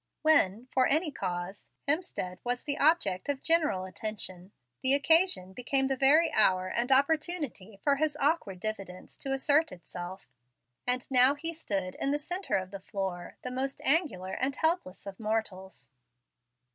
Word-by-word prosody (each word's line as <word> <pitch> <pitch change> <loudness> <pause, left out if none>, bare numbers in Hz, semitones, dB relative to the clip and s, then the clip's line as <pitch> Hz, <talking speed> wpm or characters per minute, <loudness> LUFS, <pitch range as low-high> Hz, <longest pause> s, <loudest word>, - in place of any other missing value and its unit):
When, 245 -8 +3
for 255 -1 +3
any 310 +2 +1
cause, 180 -5 -5 0.2
Hemstead 285 - -1
was 245 0 -2
the 285 -1 -2
object 280 - +2
of 280 -1 -2
general 305 - +2
attention, 190 -2 -6 0.3
the 265 +1 +4
occasion 285 - +3
became 270 +4 0
the 270 - +1
very 285 +6 +4
hour 185 -3 +4
and 240 +6 -1
opportunity 280 - 0
for 280 -1 +3
his 300 0 0
awkward 280 - 0
diffidence 195 -3 -6
to 270 - -5
assert 290 +4 +2
itself, 180 +1 -9 0.6
and 250 0 +1
now 255 +2 +6
he 330 +3 -4
stood 195 - -3
in 275 - -1
the 290 - +1
centre 355 +6 -3
of 185 -1 -5
the 200 - -7
floor, 190 -2 -5
the 250 - -4
most 265 +2 -3
angular 270 - +1
and 270 +2 -1
helpless 320 - -1
of 195 -1 -8
mortals. 190 - -4
255 Hz, 155 wpm, -29 LUFS, 190-295 Hz, 0.6 s, now